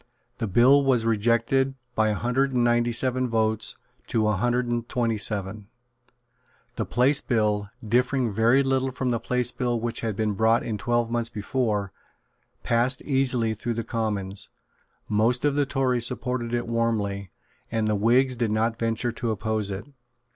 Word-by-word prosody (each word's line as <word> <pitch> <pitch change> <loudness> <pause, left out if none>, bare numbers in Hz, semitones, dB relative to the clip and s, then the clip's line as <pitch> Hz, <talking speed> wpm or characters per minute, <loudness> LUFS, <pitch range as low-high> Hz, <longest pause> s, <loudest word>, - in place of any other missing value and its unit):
The 115 - -1
bill 125 +8 +5
was 125 -4 +2
rejected 115 +4 +1 0.2
by 110 -1 +2
a 105 - 0
hundred 130 +4 0
and 125 -1 +2
ninety 120 0 +2
seven 130 +2 +1
votes 110 -1 0 0.3
to 110 -2 +1
a 105 - +2
hundred 120 +5 +1
and 120 -1 -3
twenty 115 -4 0
seven. 100 0 -2 1.1
The - - -3
Place 130 +4 +2
Bill, 105 -4 0 0.2
differing 125 0 +1
very 115 +6 +4
little 135 0 0
from 125 0 -2
the 115 - 0
Place 125 0 -1
Bill 120 -2 -1
which 115 0 -3
had 110 -3 -2
been 110 0 0
brought 110 +4 +2
in 110 -3 -3
twelve 120 +2 0
months 120 -1 -1
before, 105 -2 -2 0.7
passed 120 +2 +2
easily 130 -5 +1
through 115 +2 -4
the 115 - -2
Commons. 105 -3 -3 0.6
Most 115 +5 +1
of 145 - +3
the 145 -1 +1
Tories 130 -4 +1
supported 120 -1 -3
it 120 0 -1
warmly; 105 -4 -1 0.4
and 110 -1 0
the 110 - +1
Whigs 125 +5 +3
did 115 -2 -1
not 115 +2 0
venture 115 +1 -1
to 120 0 -4
oppose 110 -1 -1
it. 95 0 -5
115 Hz, 165 wpm, -25 LUFS, 110-125 Hz, 1.1 s, bill